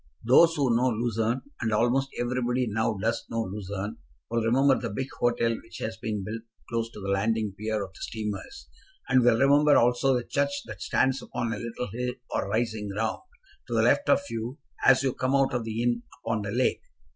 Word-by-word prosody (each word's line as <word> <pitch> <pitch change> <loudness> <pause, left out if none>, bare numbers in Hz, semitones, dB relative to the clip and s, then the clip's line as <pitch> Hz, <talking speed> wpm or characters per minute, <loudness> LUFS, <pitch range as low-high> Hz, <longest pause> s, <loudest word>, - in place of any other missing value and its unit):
Those 165 +7 +6
who 130 -5 +2
know 125 +2 +3
Lucerne, 115 +1 0 0.2
and 115 -1 0
almost 120 +5 +2
everybody 125 +1 0
now 110 0 0
does 115 +2 0
know 115 0 -1
Lucerne, 100 +1 -5 0.3
will 115 0 +1
remember 130 +5 +3
the 115 - -3
big 130 +6 -4
hotel 115 -1 +2
which 115 - -12
has 110 0 -4
been 110 -3 -3
built 110 +3 -5 0.3
close 115 -1 -2
to - - -9
the 100 -1 -5
landing 105 +1 0
pier 110 +1 -2
of 95 - -14
the - - -15
steamers, 105 - -5 0.4
and 130 -1 +5
will 120 -2 +5
remember 145 +3 +5
also 125 +2 +3
the 120 - -1
church 140 +2 -1
that - - -9
stands 130 0 +1
upon 120 -2 -3
a 105 - -5
little 115 +1 -5
hill 125 +1 -2 0.2
or - - -1
rising 110 -1 -1
ground, 110 +3 -2 0.5
to - - -2
the - - +3
left 285 - +3
of - - +5
you, 115 +4 -4 0.3
as 135 0 +6
you 130 -2 +1
come 130 +1 0
out 135 -1 +3
of 120 -2 -1
the 115 +1 -2
inn 120 -1 +1 0.2
upon 110 -1 0
the 100 - -4
lake. 125 +3 +1
115 Hz, 205 wpm, -27 LUFS, 110-125 Hz, 0.5 s, Those